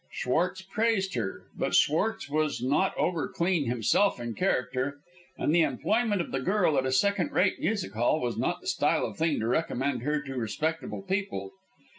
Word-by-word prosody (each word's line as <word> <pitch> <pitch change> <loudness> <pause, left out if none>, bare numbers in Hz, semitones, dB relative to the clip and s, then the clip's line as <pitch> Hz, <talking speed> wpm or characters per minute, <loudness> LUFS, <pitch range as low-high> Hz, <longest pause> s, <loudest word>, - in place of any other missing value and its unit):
Schwartz 180 +8 -1
praised 195 -1 0
her, 110 -6 -3
but - - -1
Schwartz 160 +1 +2
was 150 0 0
not 140 +10 +1
overclean 170 -2 0
himself 125 - +2
in 120 -1 -4
character, 130 - -1 0.4
and 150 - +1
the 170 - +5
employment 205 - +1
of - - -6
the 135 - -1
girl 180 +2 +2
at 130 - -1
a - - 0
second 200 +8 +2
rate 185 +1 +2
music 205 - -1
hall 120 +7 +2
was 120 -4 -2
not - - -1
the - - -10
style - - +2
of - - -7
thing 160 -2 +1
to 110 - -1
recommend 130 -1 0
her 150 +4 0
to 135 -2 -7
respectable 155 - -3
people. 190 - -3
155 Hz, 175 wpm, -28 LUFS, 130-190 Hz, 0.4 s, the